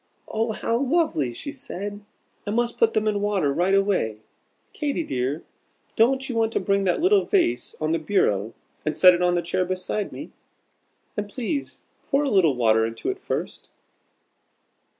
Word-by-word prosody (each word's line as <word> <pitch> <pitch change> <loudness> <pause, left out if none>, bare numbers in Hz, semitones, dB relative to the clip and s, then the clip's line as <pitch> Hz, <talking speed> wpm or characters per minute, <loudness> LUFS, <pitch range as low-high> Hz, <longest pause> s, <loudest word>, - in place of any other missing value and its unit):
"Oh, 220 0 -1
how 230 +2 -1
lovely!" 275 - +1
she 285 - -6
said; 205 -6 -6 0.5
"I - - -1
must 235 +2 -1
put 225 -1 +4
them 215 0 +1
in 205 -1 0
water 195 -9 +1
right 180 +5 +2
away. 195 - +1 0.6
Katy 300 +2 -2
dear, 130 - -2 0.5
don't 265 +4 +3
you 260 - -4
want 225 -1 +1
to - - +1
bring 200 -1 +1
that 180 - +1
little 385 +4 +4
vase 355 -4 +1
on 155 0 -1
the 165 - +1
bureau 115 - 0 0.3
and 155 - -1
set 180 -1 +8
it 175 - -1
on 175 0 +3
this 170 -1 -2
chair 185 +1 +1
beside 185 +3 -2
me? - - -8 0.8
And 205 0 -3
please 260 +6 -4 0.3
pour 280 0 +2
a 285 - 0
little 170 -9 +4
water 110 -2 +3
into 115 0 -2
it - - -8
first." - - -5
200 Hz, 170 wpm, -24 LUFS, 165-240 Hz, 0.8 s, set